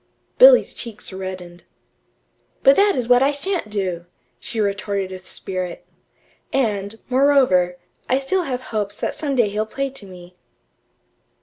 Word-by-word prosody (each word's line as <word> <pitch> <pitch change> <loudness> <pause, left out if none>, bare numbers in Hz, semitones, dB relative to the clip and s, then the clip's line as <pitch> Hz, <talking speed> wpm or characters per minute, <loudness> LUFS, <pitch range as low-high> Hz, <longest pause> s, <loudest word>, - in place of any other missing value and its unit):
Billy's - - +7
cheeks 220 -4 -7
reddened. 185 -2 -7 1.0
"But 275 - +7
that 405 0 +4
is 245 -3 -2
what 245 0 +5
I 275 +2 +4
sha'n't 310 - -3
do," 185 -4 -3 0.3
she 230 - -6
retorted 200 -1 -1
with 185 0 -10
spirit. 185 -2 -4 0.7
"And, 210 -5 -1
moreover, 255 -10 +3 0.3
I 260 - +3
still 275 +8 0
have 255 -3 -3
hopes 205 -1 -3
that - - -2
some 285 -3 -3
day 235 -5 +3
he'll 215 +2 -2
play 275 +4 -3
to 245 -7 -8
me." 180 -1 -13
215 Hz, 140 wpm, -21 LUFS, 190-270 Hz, 1.0 s, Billy's